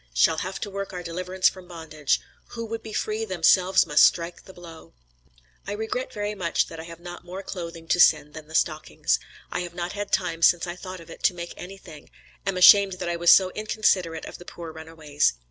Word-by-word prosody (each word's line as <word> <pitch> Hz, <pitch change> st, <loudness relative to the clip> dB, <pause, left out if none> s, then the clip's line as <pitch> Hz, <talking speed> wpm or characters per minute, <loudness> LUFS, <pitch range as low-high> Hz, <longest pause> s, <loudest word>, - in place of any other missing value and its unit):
Shall 60 Hz, -, +4 dB
have 185 Hz, +1 st, -4 dB
to 205 Hz, -, -4 dB
work 195 Hz, 0 st, -5 dB
our 180 Hz, -1 st, -5 dB
deliverance 185 Hz, +2 st, 0 dB
from 185 Hz, -1 st, -4 dB
bondage. 160 Hz, -4 st, -2 dB, 0.3 s
'Who 230 Hz, -1 st, -5 dB
would 225 Hz, 0 st, -5 dB
be 220 Hz, -, -9 dB
free, 215 Hz, +1 st, -2 dB
themselves 185 Hz, 0 st, +3 dB
must 150 Hz, -, +5 dB
strike 170 Hz, 0 st, +2 dB
the -, -, -12 dB
blow.' 170 Hz, -, -13 dB, 0.7 s
"I -, -, -3 dB
regret 220 Hz, +5 st, -3 dB
very 210 Hz, -3 st, -3 dB
much 180 Hz, -5 st, 0 dB
that 165 Hz, -, -9 dB
I 160 Hz, -, -7 dB
have 165 Hz, -1 st, -11 dB
not 175 Hz, 0 st, -9 dB
more 185 Hz, +3 st, -8 dB
clothing 170 Hz, -3 st, -7 dB
to -, -, +2 dB
send 150 Hz, -3 st, +5 dB
than 155 Hz, -1 st, -10 dB
the 160 Hz, -, -9 dB
stockings. 155 Hz, -, 0 dB, 0.3 s
I -, -, -2 dB
have 175 Hz, -1 st, -6 dB
not 175 Hz, 0 st, -3 dB
had 205 Hz, 0 st, -5 dB
time 170 Hz, -3 st, 0 dB
since 175 Hz, +1 st, +5 dB
I 175 Hz, 0 st, -5 dB
thought 185 Hz, 0 st, -8 dB
of 165 Hz, -, -13 dB
it, -, -, -11 dB
to 180 Hz, -, +3 dB
make 170 Hz, 0 st, -7 dB
anything; 180 Hz, -5 st, -11 dB, 0.4 s
am 195 Hz, -2 st, 0 dB
ashamed 195 Hz, +1 st, +8 dB
that 180 Hz, -1 st, -4 dB
I 170 Hz, -, -1 dB
was 170 Hz, 0 st, +2 dB
so 185 Hz, 0 st, +7 dB
inconsiderate 185 Hz, -6 st, 0 dB
of -, -, -10 dB
the -, -, -10 dB
poor 170 Hz, -2 st, -8 dB
runaways. 160 Hz, -2 st, -1 dB
175 Hz, 215 wpm, -25 LUFS, 165-195 Hz, 0.7 s, ashamed